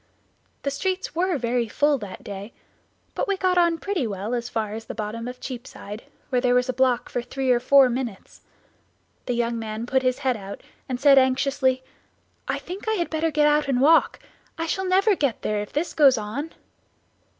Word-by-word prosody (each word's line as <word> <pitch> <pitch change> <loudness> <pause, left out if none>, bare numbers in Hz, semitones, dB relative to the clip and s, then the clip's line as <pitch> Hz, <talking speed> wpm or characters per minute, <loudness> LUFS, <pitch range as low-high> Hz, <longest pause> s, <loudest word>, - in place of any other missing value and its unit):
The 280 - -1
streets 370 +7 -2
were 355 0 +1
very 240 -1 0
full 290 +5 +2
that 200 -4 -8
day, 200 +3 -7 0.6
but - - -2
we 400 -1 0
got 370 -1 +2
on 340 -1 +3
pretty 350 - -2
well 205 +3 -4
as 240 0 -2
far 215 -2 -2
as 225 +1 -6
the - - -7
bottom 220 +2 -4
of 250 0 -7
Cheapside, 230 -4 -8 0.2
where 250 -2 +1
there 250 -1 +3
was 250 +1 +2
a 255 - -1
block 255 -1 +2
for 245 - -3
three 260 +1 -1
or 245 - +4
four 270 +2 +6
minutes. 245 -5 -5 0.9
The 245 - 0
young 235 0 -1
man 220 0 -4
put 260 +2 +1
his 255 -1 +1
head 255 -2 +3
out 200 -1 -8 0.3
and 250 -1 -2
said 275 -1 +7
anxiously, 260 0 +1 0.6
"I - - 0
think 375 +5 -8
I - - +2
had 350 -5 -1
better 320 +1 0
get 300 -1 +2
out 295 0 +3
and 265 -3 +1
walk; 315 +5 +4 0.4
I 330 - -2
shall 380 +3 -2
never 385 +3 +4
get 280 - -1
there 210 -1 0
if 205 - -7
this 325 +4 -2
goes 275 -5 +5
on." 235 +10 -4
260 Hz, 200 wpm, -24 LUFS, 235-300 Hz, 0.9 s, said